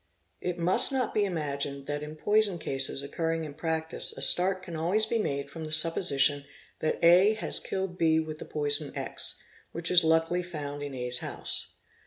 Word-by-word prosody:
It 180 -1 -4
must 175 +8 +5
not 260 -3 -2
be 210 - +1
imagined 140 -5 -5
that 145 +1 -5
in 150 +1 -9
poison 205 +2 +2
cases 135 -3 -3
occurring 165 +2 -4
in 150 - -9
practice 160 +1 -2
a - - -8
start 185 +1 +5
can 170 -3 -9
always 180 +7 +2
be 230 - -2
made 140 -8 -3
from 160 +2 -9
the 155 - -8
supposition 150 -3 +4 0.4
that 155 - -2
A 185 +6 +5
has 220 - -3
killed 190 -2 -6
B 160 -1 +2
with 155 -1 -6
the - - -8
poison 145 -1 0
X, - - -2 0.4
which 165 +1 -1
is 180 -1 +8
luckily 165 +2 +1
found 145 -5 -7
in 145 -2 -7
A's 125 0 -1
house. - - -3
160 Hz, 185 wpm, -27 LUFS, 145-180 Hz, 0.4 s, is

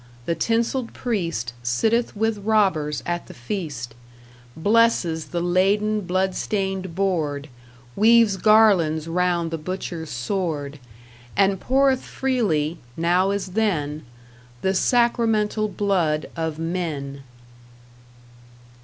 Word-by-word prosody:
the 170 - 0
tinsel'd 230 - -1
priest 170 - -2
Sitteth 220 - 0
with 220 0 0
robbers 190 -9 +1
at 175 0 -3
the - - -11
feast, 125 - -5 0.6
Blesses 195 -4 +2
the 175 - -3
laden, 200 +4 +2
blood 185 +1 +1
stained 190 -3 -2
board, 155 -7 -1 0.5
Weaves 225 -1 +5
garlands 190 -8 +4
round 175 -1 0
the 165 - -3
butcher's 170 -1 -5
sword, 145 - -3 0.6
And 195 -1 +3
poureth 265 +2 +2
freely 185 - -1 0.2
(now 175 +3 +2
as 200 -1 -2
then) 155 -8 -1 0.6
The 190 - +2
sacramental 225 -1 +2
blood 180 -7 0
of 160 -2 -3
Men! 160 -5 -4
185 Hz, 100 wpm, -23 LUFS, 160-215 Hz, 0.6 s, Weaves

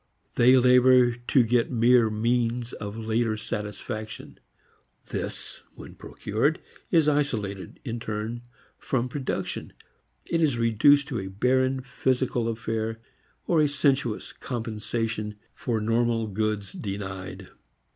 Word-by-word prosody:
They 125 +2 +6
labor 125 0 +6
to 120 +2 +2
get 115 +1 +2
mere 120 -1 +4
means 115 +2 0
of 105 +1 -6
later 110 0 0
satisfaction. 110 +1 -6 0.7
This - - -5
when - - -11
procured - - -1 0.3
is 160 -3 +4
isolated 110 -10 -1
in 120 -2 -3
turn 110 +1 -4 0.4
from 130 -2 -1
production 135 0 -4 0.6
and 165 - +3
is 145 -7 +2
reduced 115 +5 +4
to 120 - -2
a 95 - -5
barren 130 +6 +1
physical 125 -2 0
affair 115 0 -2 0.5
or 165 -3 +3
a 150 - +4
sensuous 135 -5 0
compensation 110 -2 -3 0.2
for 115 -3 -2
normal 115 +1 +1
goods 105 -1 -2
denied. 95 -2 -6
115 Hz, 115 wpm, -26 LUFS, 110-125 Hz, 0.7 s, They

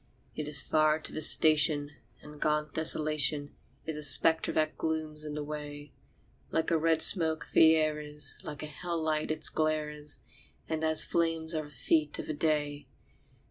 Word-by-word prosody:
It 150 - -6
is 140 -2 +2
far 155 0 +1
to 160 - -6
the 155 - -5
station, 150 -1 +3 0.3
and 150 0 -14
gaunt 150 -1 -2
Desolation 155 -2 +1 0.3
Is 160 -1 -4
a - - -5
spectre 160 +3 +4
that 155 0 -2
glooms 155 -1 -4
in 150 -1 -7
the 150 - -5
way; 145 -1 -9 0.6
Like 160 +1 -3
a 165 - +2
red 160 0 +1
smoke 160 -4 +7
the 160 0 +5
air 155 -1 -1
is, 150 0 -4
like 150 0 -9
a - - -5
hell 170 +3 -6
light 155 -1 -3
its 155 - -1
glare 155 -1 -2
is, 150 0 -6 0.5
And 160 0 -4
as 160 0 +1
flame 165 -1 -2
are 155 -1 -4
the - - -15
feet 150 +3 -2
of - - -7
the 155 - -5
day. 145 -1 -3
155 Hz, 180 wpm, -28 LUFS, 150-160 Hz, 0.6 s, smoke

